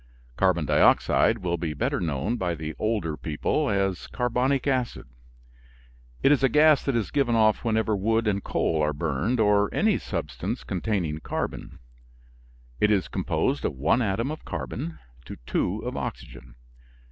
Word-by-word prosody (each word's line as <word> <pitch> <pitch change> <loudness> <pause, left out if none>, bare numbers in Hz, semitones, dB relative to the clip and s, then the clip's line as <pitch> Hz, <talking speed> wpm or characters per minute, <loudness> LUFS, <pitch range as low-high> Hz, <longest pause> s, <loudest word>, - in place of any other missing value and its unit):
Carbon 90 -3 +2
dioxide 115 - +4
will 85 -1 0
be 80 -2 -3
better - - -1
known 80 - -1
by 90 -6 -2
the 80 0 -5
older 105 -8 -1
people 75 0 -1
as 95 -2 -1
carbonic 125 +2 0
acid. 130 -3 -1 1.2
It 135 - +5
is 145 - +4
a 135 - +4
gas 150 +2 +5
that 140 - 0
is 115 -4 -1
given 135 -5 +1
off 110 -1 +3
whenever 110 -2 +1
wood 110 +3 +1
and 100 -1 0
coal 80 -1 0
are 75 0 +1
burned, 80 - -1
or 105 -1 +3
any 215 -2 +2
substance - - -4
containing 85 - -2
carbon. - - -5 1.0
It 105 - +3
is 100 -3 +2
composed - - -1
of - - -1
one 80 - +2
atom 115 +5 -1
of 155 - -7
carbon 80 -1 -5 0.3
to - - -8
two - - -1
of - - -4
oxygen. - - -7
100 Hz, 155 wpm, -26 LUFS, 80-120 Hz, 1.2 s, It